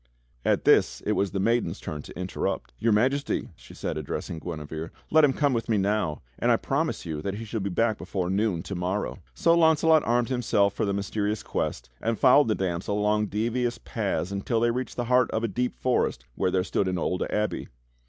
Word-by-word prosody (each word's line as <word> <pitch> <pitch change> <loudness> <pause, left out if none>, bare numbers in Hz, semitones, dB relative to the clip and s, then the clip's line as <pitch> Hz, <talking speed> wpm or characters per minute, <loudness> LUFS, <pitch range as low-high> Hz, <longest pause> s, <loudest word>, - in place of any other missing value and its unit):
At - - +1
this - - +4
it - - +1
was 100 - +1
the 95 - -3
maiden's 115 +5 +1
turn 75 -1 -5
to - - -10
interrupt. 90 0 -3
"Your 115 - +2
Majesty," 130 +7 +1
said - - -15 0.2
she - - -2
addressing 75 +2 -4
Guinevere, 80 -1 -6 0.2
"let 155 0 +6
him 145 - +6
come 145 0 +1
with 115 0 -2
me 110 - +3
now, 100 -7 0 0.2
and - - +1
I - - +5
promise - - -1
you 80 -3 -4
that 100 +4 -3
he 115 +2 -6
shall 110 +1 -3
be 100 0 -2
back 110 +3 +1
before 90 -3 -3
noon 95 -4 0
to - - -6
morrow." 95 +3 -2 0.2
So 165 - +4
Launcelot 160 -1 +5
armed 120 +1 +1
himself 105 -6 +2
for - - -1
the 100 - 0
mysterious 105 +1 -2
quest, - - -3
and 115 0 0
fol 130 +1 +6
lowed 145 - +3
the 110 - +2
damsel 95 +2 -2
along 105 0 +2
devious 120 +3 -1
paths 100 -4 -2
until 100 +4 -1
they 120 +1 +3
reached 130 +2 -3
the 120 - -2
heart 125 0 +3
of 110 - -2
a - - +2
deep 125 +4 -2
forest 130 -1 0
where - - 0
there 90 0 +1
stood 95 +1 0
an 90 -1 -1
old 90 +2 -1
abbey. 105 0 -1
105 Hz, 215 wpm, -26 LUFS, 95-120 Hz, 0.2 s, let